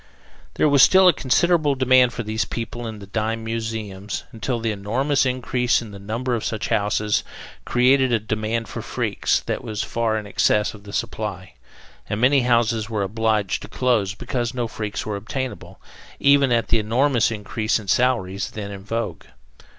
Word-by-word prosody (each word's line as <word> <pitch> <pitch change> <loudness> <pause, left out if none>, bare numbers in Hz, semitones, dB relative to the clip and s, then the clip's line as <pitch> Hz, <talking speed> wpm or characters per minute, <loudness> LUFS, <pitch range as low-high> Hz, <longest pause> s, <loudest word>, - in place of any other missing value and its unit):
There - - +3
was 140 -2 +5
still 190 +7 +7
a 180 - +7
considerable 150 +2 +2
demand 130 -1 +4
for 120 - -5
these 110 +1 -1
people 120 0 -5
in 110 -1 -6
the 100 - -10
dime 110 +2 -2
museums, 110 -3 -4
until 120 +1 -3
the 115 -1 -1
enormous 130 +8 0
increase 125 -1 +1
in 115 -3 -9
the 100 - -10
number 115 +5 -3
of 115 - -1
such 110 -2 -3
houses 105 0 +1 0.4
created 130 +1 +3
a 115 - +4
demand 110 +1 -2
for - - -6
freaks - - -1
that - - -4
was 110 -1 -3
far 115 -2 -1
in 105 - -5
excess 105 +1 +1
of 105 -1 -14
the 100 - -9
supply, 105 -4 -4 0.6
and 105 - -2
many 135 +4 +5
houses 115 -2 +1
were 105 -3 -1
obliged 110 -1 0
to - - -8
close 110 -4 0
because 120 0 -3
no 120 -2 -1
freaks 105 -2 -5
were 105 -2 -3
obtainable, 115 -1 -6 0.4
even 140 -2 +4
at 115 -1 +1
the 115 - +3
enormous 120 +3 +2
increase 110 0 -1
in 110 -3 -9
salaries 100 -4 +1
then 100 -2 -6
in 100 -1 -8
vogue. 115 +3 -4
115 Hz, 175 wpm, -22 LUFS, 105-125 Hz, 0.6 s, still